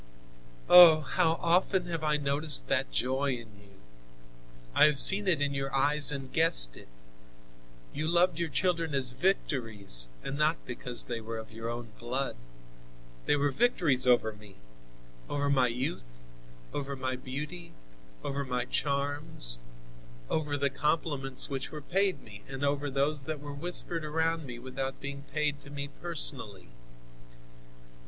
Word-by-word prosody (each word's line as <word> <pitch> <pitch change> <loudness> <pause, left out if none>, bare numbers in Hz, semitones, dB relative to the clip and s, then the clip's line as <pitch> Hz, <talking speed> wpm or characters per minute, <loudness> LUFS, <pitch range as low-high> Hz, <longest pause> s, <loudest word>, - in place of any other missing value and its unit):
"Oh! 170 -3 +9
how 165 +1 +2
often 180 +2 +1
have 165 -2 -5
I 150 -1 +1
noticed 145 +1 +4
that - - 0
joy 130 - 0
in 115 -4 -9
you! 100 -1 -20 0.9
I - - +6
have 150 -2 +2
seen 195 +7 +8
it 165 -6 +1
in 140 -1 -1
your 135 0 -3
eyes 145 +1 +5
and 135 -2 -6
guessed 155 - +4
it. - - -14 1.1
You 155 +2 -3
loved 170 0 +2
your 170 -1 -2
children 165 -2 0
as 130 -2 +1
victories, 115 - 0 0.2
and 140 +2 -5
not 155 +2 +2
because 125 -1 -1
they 120 -2 -4
were 115 +1 -6
of 110 -1 -9
your 115 +1 -6
own 120 -1 -7
blood. 130 +3 -2 0.9
They - - +3
were 145 0 0
victories 145 - +2
over 120 -3 +3
me, 105 -2 -15 0.7
over 145 0 -1
my 130 -3 +3
youth, 115 - -5 0.6
over 140 -1 -4
my 130 -1 -3
beauty, 150 +7 -7 0.5
over 140 0 -3
my 125 -2 -3
charms, 140 - -3 0.7
over 150 -2 -1
the 140 -1 -1
compliments 145 -2 +1
which 135 -1 -5
were 155 - -8
paid 190 +5 -1
me 105 -1 -12
and 135 +1 -4
over 145 0 -1
those 140 +1 -1
that 155 0 -4
were 145 0 -8
whispered 170 +2 -2
around 160 0 -1
me 120 -1 -8
without 130 +2 -5
being 140 0 -7
paid 150 -2 -1
to 145 - -14
me 140 0 -5
personally. 130 - -2
140 Hz, 150 wpm, -29 LUFS, 125-155 Hz, 1.1 s, Oh